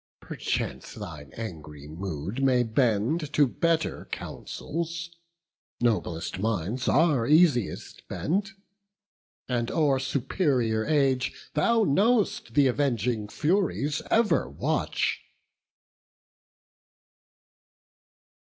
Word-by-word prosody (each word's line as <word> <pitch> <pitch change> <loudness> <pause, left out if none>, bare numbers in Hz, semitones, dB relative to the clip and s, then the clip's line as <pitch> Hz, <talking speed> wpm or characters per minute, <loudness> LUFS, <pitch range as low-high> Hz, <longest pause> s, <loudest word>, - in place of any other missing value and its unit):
perchance - - -4
thine 75 -3 -8
angry 75 -9 -8
mood 90 - -5
May 125 -2 +4
bend 120 +6 +1
to 145 - +5
better 165 +5 0
counsels; 170 +1 -5 0.7
noblest 100 -8 -1
minds 110 +4 -1
Are 145 -6 +3
easiest 150 - +2
bent; 195 +4 -1 0.9
and 120 -2 -1
o'er 145 -4 +2
superior 130 - 0
age 135 -4 0
Thou 225 +9 +3
know'st 205 - +2
th' 145 - +5
avenging 120 -5 0
Furies 155 - 0
ever 225 -1 +2
watch." - - -1
130 Hz, 80 wpm, -27 LUFS, 110-160 Hz, 0.9 s, to